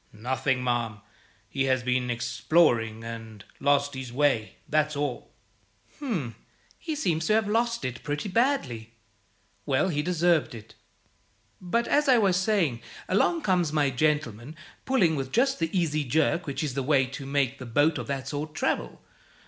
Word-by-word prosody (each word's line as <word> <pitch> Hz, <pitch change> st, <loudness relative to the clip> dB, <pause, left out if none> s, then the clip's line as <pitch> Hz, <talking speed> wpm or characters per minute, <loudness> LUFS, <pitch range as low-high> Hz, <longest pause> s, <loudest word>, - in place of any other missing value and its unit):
"Nothing, 130 Hz, +3 st, -1 dB
ma'am. 120 Hz, -3 st, -1 dB, 0.5 s
He 135 Hz, +5 st, -1 dB
has 130 Hz, -2 st, +1 dB
been 125 Hz, 0 st, 0 dB
exploring, 120 Hz, -1 st, +1 dB
and 110 Hz, -2 st, -8 dB
lost 145 Hz, 0 st, +2 dB
his 130 Hz, -2 st, -6 dB
way; 130 Hz, -4 st, +1 dB
that's 150 Hz, 0 st, +1 dB
all." 145 Hz, -3 st, -3 dB, 0.7 s
"H'm! 185 Hz, -, -3 dB, 0.5 s
he 320 Hz, -2 st, -4 dB
seems 165 Hz, -, 0 dB
to -, -, +3 dB
have 220 Hz, -1 st, +2 dB
lost 230 Hz, -, 0 dB
it 125 Hz, -1 st, -4 dB
pretty 150 Hz, +6 st, -3 dB
badly. 185 Hz, -, 0 dB, 0.7 s
Well, 145 Hz, +7 st, +1 dB
he 150 Hz, -4 st, 0 dB
deserved 170 Hz, -4 st, +1 dB
it. 110 Hz, -2 st, -12 dB, 0.9 s
But, 230 Hz, +6 st, 0 dB
as 295 Hz, 0 st, +2 dB
I 255 Hz, -, +7 dB
was 195 Hz, -5 st, +3 dB
saying, 180 Hz, -, +1 dB, 0.3 s
along 320 Hz, -, +2 dB
comes 180 Hz, -5 st, +2 dB
my 145 Hz, -3 st, +2 dB
gentleman, 145 Hz, -2 st, -1 dB, 0.3 s
pulling 195 Hz, -12 st, +3 dB
with 135 Hz, -2 st, -4 dB
just 270 Hz, +1 st, +2 dB
the 165 Hz, -1 st, 0 dB
easy 155 Hz, -5 st, 0 dB
jerk 155 Hz, +5 st, +1 dB
which 140 Hz, +3 st, -3 dB
is 145 Hz, -4 st, -2 dB
the 135 Hz, -, -1 dB
way 135 Hz, 0 st, +3 dB
to 135 Hz, +1 st, -8 dB
make 140 Hz, -1 st, 0 dB
a -, -, -6 dB
boat 145 Hz, +5 st, +2 dB
of 120 Hz, -, -6 dB
that 135 Hz, -2 st, -3 dB
sort 150 Hz, +1 st, -4 dB
travel. -, -, -2 dB
145 Hz, 160 wpm, -27 LUFS, 125-175 Hz, 0.9 s, I